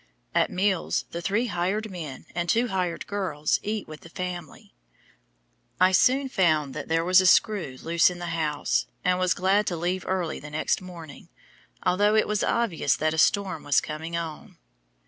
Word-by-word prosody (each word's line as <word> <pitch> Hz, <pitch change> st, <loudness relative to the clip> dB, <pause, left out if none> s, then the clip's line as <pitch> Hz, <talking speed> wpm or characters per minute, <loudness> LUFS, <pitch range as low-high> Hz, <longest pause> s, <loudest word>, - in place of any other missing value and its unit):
At -, -, +2 dB
meals 190 Hz, -1 st, 0 dB
the 170 Hz, -, -4 dB
three 205 Hz, +7 st, 0 dB
"hired 200 Hz, +2 st, -2 dB
men" 155 Hz, -7 st, -7 dB
and 175 Hz, 0 st, -2 dB
two 235 Hz, +1 st, +2 dB
"hired 180 Hz, -3 st, -2 dB
girls" 185 Hz, -7 st, -1 dB
eat 210 Hz, 0 st, -3 dB
with 155 Hz, -1 st, -10 dB
the 165 Hz, -, -13 dB
family. 175 Hz, -3 st, -7 dB, 1.1 s
I 185 Hz, +1 st, +5 dB
soon 265 Hz, +8 st, +3 dB
found 155 Hz, -, +1 dB
that 150 Hz, -, -6 dB
there 165 Hz, +1 st, +1 dB
was 185 Hz, +1 st, +6 dB
a 185 Hz, -, +2 dB
screw 180 Hz, -, +3 dB
loose 170 Hz, +2 st, +4 dB
in 180 Hz, -, -7 dB
the 175 Hz, -, -6 dB
house, 150 Hz, -, 0 dB, 0.2 s
and 180 Hz, 0 st, +2 dB
was 185 Hz, -1 st, +2 dB
glad 195 Hz, +3 st, +2 dB
to 175 Hz, -, -1 dB
leave 180 Hz, +3 st, -2 dB
early 180 Hz, -4 st, -1 dB
the 150 Hz, -, -9 dB
next 155 Hz, +4 st, -1 dB
morning, 170 Hz, -5 st, -11 dB, 0.5 s
although 205 Hz, +4 st, +3 dB
it 215 Hz, -, +3 dB
was 210 Hz, 0 st, 0 dB
obvious 230 Hz, -9 st, +1 dB
that 155 Hz, 0 st, 0 dB
a 160 Hz, -, -1 dB
storm 195 Hz, -3 st, +2 dB
was 145 Hz, -2 st, +3 dB
coming 160 Hz, +2 st, -5 dB
on. 165 Hz, -2 st, -7 dB
180 Hz, 180 wpm, -26 LUFS, 160-195 Hz, 1.1 s, was